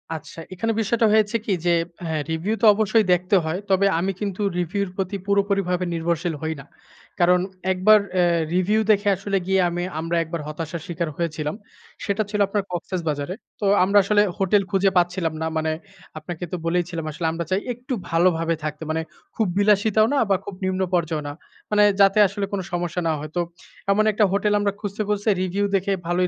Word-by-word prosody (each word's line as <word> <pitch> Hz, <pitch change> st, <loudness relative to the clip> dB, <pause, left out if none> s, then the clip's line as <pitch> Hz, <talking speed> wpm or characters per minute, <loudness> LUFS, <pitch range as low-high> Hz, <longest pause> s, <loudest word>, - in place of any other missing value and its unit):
আচ্ছা। 160 Hz, +1 st, -9 dB
এখানে 225 Hz, +5 st, -1 dB
বিষয়টা 225 Hz, +2 st, +1 dB
হয়েছে 215 Hz, +1 st, +3 dB
কি 200 Hz, -, +1 dB
যে, 175 Hz, -, +4 dB, 0.3 s
হ্যাঁ 160 Hz, -2 st, -1 dB
রিভিউ 170 Hz, +7 st, -1 dB
তো -, -, +4 dB
অবশ্যই 215 Hz, 0 st, +2 dB
দেখতে 180 Hz, +3 st, +1 dB
হয়। 165 Hz, +4 st, -2 dB
তবে 195 Hz, +1 st, +3 dB
আমি 190 Hz, +3 st, 0 dB
কিন্তু 205 Hz, -1 st, -3 dB, 0.2 s
রিভিউ 185 Hz, +4 st, -1 dB
এর 180 Hz, -, -10 dB
প্রতি 195 Hz, +1 st, -2 dB
পুরোপুরিভাবে 195 Hz, -3 st, +1 dB
নির্ভরশীল 170 Hz, 0 st, -1 dB
হই 160 Hz, 0 st, -1 dB
না। -, -, -15 dB, 0.5 s
কারণ 180 Hz, +1 st, +5 dB, 0.3 s
একবার 210 Hz, +4 st, +5 dB
অ্যা 180 Hz, -1 st, +3 dB, 0.3 s
রিভিউ 205 Hz, +4 st, +2 dB
দেখে 205 Hz, 0 st, +2 dB
আসলে 195 Hz, +1 st, -2 dB
গিয়ে 190 Hz, 0 st, +3 dB
আমি 175 Hz, +1 st, -3 dB, 0.2 s
আমরা 165 Hz, +1 st, -2 dB
একবার 165 Hz, 0 st, -5 dB
হতাশার 160 Hz, +1 st, -5 dB
শিকার 170 Hz, -2 st, -3 dB
হয়েছিলাম। 155 Hz, -2 st, -2 dB, 0.5 s
সেটা 205 Hz, +2 st, 0 dB
ছিল 210 Hz, -1 st, -2 dB
আপনার 200 Hz, 0 st, -1 dB
কক্সেসবাজারে। 170 Hz, -2 st, -3 dB, 0.2 s
তো 205 Hz, -, -2 dB, 0.2 s
আমরা 200 Hz, +2 st, +3 dB
আসলে 205 Hz, +1 st, +3 dB, 0.2 s
হোটেল 195 Hz, +1 st, +3 dB
খুঁজে 195 Hz, 0 st, +3 dB
পাচ্ছিলাম 175 Hz, -2 st, +1 dB
না। 160 Hz, -, 0 dB
মানে 160 Hz, 0 st, 0 dB, 0.5 s
আপনাকে 175 Hz, -1 st, -7 dB
তো -, -, -1 dB
বলেইছিলাম 170 Hz, -1 st, -1 dB
আসলে 165 Hz, +1 st, -2 dB
আমরা 165 Hz, 0 st, -4 dB
চাই 190 Hz, +2 st, +1 dB
একটু 250 Hz, +2 st, -6 dB, 0.2 s
ভালোভাবে 165 Hz, -1 st, +2 dB
থাকতে। 155 Hz, +1 st, -4 dB
মানে 160 Hz, 0 st, -1 dB, 0.3 s
খুব 220 Hz, -4 st, +1 dB
বিলাসিতাও 210 Hz, +1 st, +4 dB
না -, -, +2 dB
বা 195 Hz, -, +4 dB
খুব 200 Hz, -, -7 dB
নিম্ন 185 Hz, 0 st, -1 dB
পর্যায়েও 160 Hz, -3 st, 0 dB
না। 145 Hz, -, -5 dB, 0.4 s
মানে 210 Hz, 0 st, +5 dB, 0.2 s
যাতে 195 Hz, +2 st, +5 dB
আসলে 200 Hz, +1 st, -3 dB
কোন 200 Hz, -, -1 dB
সমস্যা 175 Hz, 0 st, -2 dB
না 160 Hz, -, +2 dB
হয়। 155 Hz, 0 st, -6 dB
তো 175 Hz, -, +2 dB, 0.5 s
এমন 215 Hz, +2 st, +3 dB
১ -, -, -12 dB
টা 210 Hz, -, +6 dB
হোটেল 210 Hz, +1 st, +1 dB
আমরা 205 Hz, -1 st, +1 dB
খুঁজতে, 205 Hz, 0 st, -4 dB
খুঁজতে, 210 Hz, +1 st, 0 dB
রিভিউ 195 Hz, +3 st, 0 dB
দেখে 195 Hz, +1 st, 0 dB, 0.2 s
ভালোই 180 Hz, +1 st, +1 dB
185 Hz, 190 wpm, -23 LUFS, 170-205 Hz, 0.5 s, টা